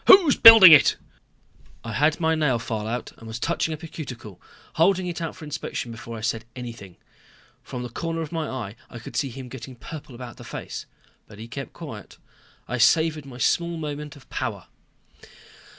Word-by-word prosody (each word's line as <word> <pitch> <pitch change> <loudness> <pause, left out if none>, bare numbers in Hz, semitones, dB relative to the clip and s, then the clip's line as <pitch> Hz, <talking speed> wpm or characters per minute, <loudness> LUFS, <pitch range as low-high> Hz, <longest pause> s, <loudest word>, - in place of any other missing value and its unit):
Who's 365 -8 +8
building 225 -6 +11
it?" 150 -4 +7 0.9
I 115 -1 -6
had 150 +7 +2
my 160 -1 +2
nail 150 -6 +1
file 110 -2 -4
out 120 +2 -4
and 115 - -11
was 110 0 -5
touching 165 +5 -1
up 155 +1 -6
a - - -6
cuticle, 120 - -9 0.3
holding 185 +3 +3
it 175 -1 -4
out 165 - -4
for 165 - -10
inspection 150 -5 -5
before 115 0 -8
I - - -8
said 110 0 -2
anything. 115 -7 -9 0.7
From 125 -1 -7
the 125 - -6
corner 165 +6 -4
of 155 - -6
my 160 -3 -3
eye 120 -6 -5
I 120 - -9
could 115 - -10
see 135 - 0
him 130 +1 -9
getting 130 +1 -9
purple 145 +1 -10
about 120 -1 -9
the - - -11
face - - -7 0.4
but 105 - -14
he 110 +2 -9
kept 135 +1 -7
quiet. - - -10 0.5
I 120 +1 -3
savored 155 +3 +3
my 125 -2 -10
small 170 +6 0
moment 150 -1 -6
of 140 - -17
power. 110 -7 -4
135 Hz, 190 wpm, -24 LUFS, 115-160 Hz, 0.9 s, building